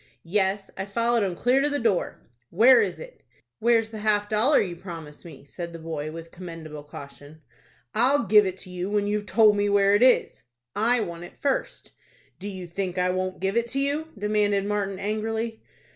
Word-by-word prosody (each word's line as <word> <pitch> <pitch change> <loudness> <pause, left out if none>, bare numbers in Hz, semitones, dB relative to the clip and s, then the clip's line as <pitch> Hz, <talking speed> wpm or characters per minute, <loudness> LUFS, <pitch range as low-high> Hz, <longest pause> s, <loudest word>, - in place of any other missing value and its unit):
"Yes, 195 +2 0
I 190 - -4
followed 230 +3 +1
'em 190 -3 -1
clear 250 +8 +2
to 290 - +1
the 290 - -1
door." 225 -8 -1 0.3
"Where 235 +6 +6
is 200 -4 -2
it?" - - -11 0.4
"Where's 225 -1 +2
the 220 - -7
half 210 -1 +1
dollar 220 +8 +3
you 180 -3 -2
promised 165 -4 -10
me?" 160 -4 -12
said 170 +3 -7
the - - -7
boy, 160 -2 -5
with 165 +1 -9
commendable 165 -4 -9
caution. 145 +1 -12 0.5
"I'll 260 +4 +3
give 210 0 +5
it 185 0 -4
to 185 - -12
you 180 +1 -4
when 205 0 +1
you've 210 0 -2
told 215 -2 +5
me 205 0 +1
where 200 0 +4
it 205 - +3
is." 255 0 +3 0.3
"I 235 +3 +2
want 170 -3 -5
it - - -15
first." 275 -2 -2 0.5
"Do 200 +2 -5
you 185 -2 -7
think 180 +1 -4
I 180 0 +2
won't 185 0 -3
give 195 +2 -1
it 235 0 +1
to 275 - 0
you?" 285 +3 -1
demanded 205 -1 +1
Martin, 200 -2 -2
angrily. 220 +2 -3
205 Hz, 195 wpm, -25 LUFS, 180-225 Hz, 0.5 s, Where